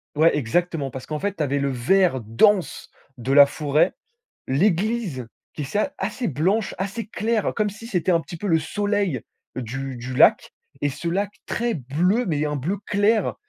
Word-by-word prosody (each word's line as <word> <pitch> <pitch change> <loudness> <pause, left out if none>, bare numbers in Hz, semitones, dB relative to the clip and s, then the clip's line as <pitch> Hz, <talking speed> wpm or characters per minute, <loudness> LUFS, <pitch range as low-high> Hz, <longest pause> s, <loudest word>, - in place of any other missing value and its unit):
ouais, 160 +2 +4
exactement. 150 +2 0
Parce 130 0 -7
qu'en 155 -1 -4
fait, 200 +2 -2
tu 155 - -1
avais 140 0 0
le 140 - 0
vert 135 +3 +2
dense 180 - +2 0.3
de 125 +3 -2
la 140 0 +9
forêt, 150 +4 +1 0.6
l'église 180 - 0 0.3
qui, 150 - -4
c'est 210 - 0
assez 245 - -3
blanche, 185 - 0
assez 200 +4 -3
claire, 220 0 -1
comme 210 -1 +1
si 215 +3 -10
c'était 185 -3 0
un 165 - +3
petit 170 0 -9
peu 205 - -4
le 165 -3 +3
soleil 205 - -1 0.4
du 130 +2 -5
du 125 +2 -6
lac, - - +4 0.3
et 145 - +2
ce 170 +5 -6
lac 200 +3 -1
très 235 -1 -1
bleu, 175 - 0
mais 150 -3 0
un 150 - -2
bleu 175 +10 -2
clair, 210 +1 +2
170 Hz, 180 wpm, -23 LUFS, 140-205 Hz, 0.6 s, la